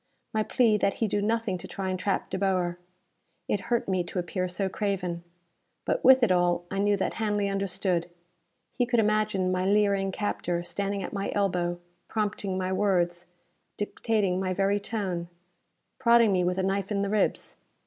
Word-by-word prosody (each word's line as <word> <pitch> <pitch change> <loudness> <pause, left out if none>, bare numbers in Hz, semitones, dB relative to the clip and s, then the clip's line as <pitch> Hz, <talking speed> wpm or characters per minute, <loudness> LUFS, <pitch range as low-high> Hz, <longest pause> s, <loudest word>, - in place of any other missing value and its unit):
My 220 - +2
plea 220 0 +3
that 200 -1 +1
he 225 - 0
do 205 0 0
nothing 220 -3 0
to - - -8
try 190 -1 -3
and 185 - -3
trap 195 +1 -1
De 190 - -2
Boer! 180 -3 0 0.7
It 205 - 0
hurt 235 -1 +1
me 185 -2 +1
to 180 - -7
appear 180 +1 -1
so 185 +2 -1
craven. 185 -4 -2 0.6
But - - 0
with 260 -1 +7
it 220 - +4
all, 175 -1 +2
I 195 - -2
knew 205 0 +3
that 190 - -1
Hanley 205 -2 +1
understood. 190 -3 -1 0.6
He 245 - 0
could 240 -1 +2
imagine 210 -3 +1
my 185 0 0
leering 200 -1 +2
captor 175 -3 -2
standing 200 +2 -2
at - - -6
my 200 -1 -2
elbow, 175 -3 0 0.3
prompting 205 -3 -2
my 185 0 -1
words, 175 -3 +1 0.5
dictating 205 -3 0
my 185 -1 -1
very 200 +1 +2
tone 195 -5 -3 0.7
prodding 235 -3 +5
me 185 -2 +2
with 180 +1 0
a 190 - 0
knife 195 +1 -1
in 200 -1 +1
the 200 - -1
ribs. 210 -1 0
195 Hz, 180 wpm, -27 LUFS, 185-210 Hz, 0.7 s, with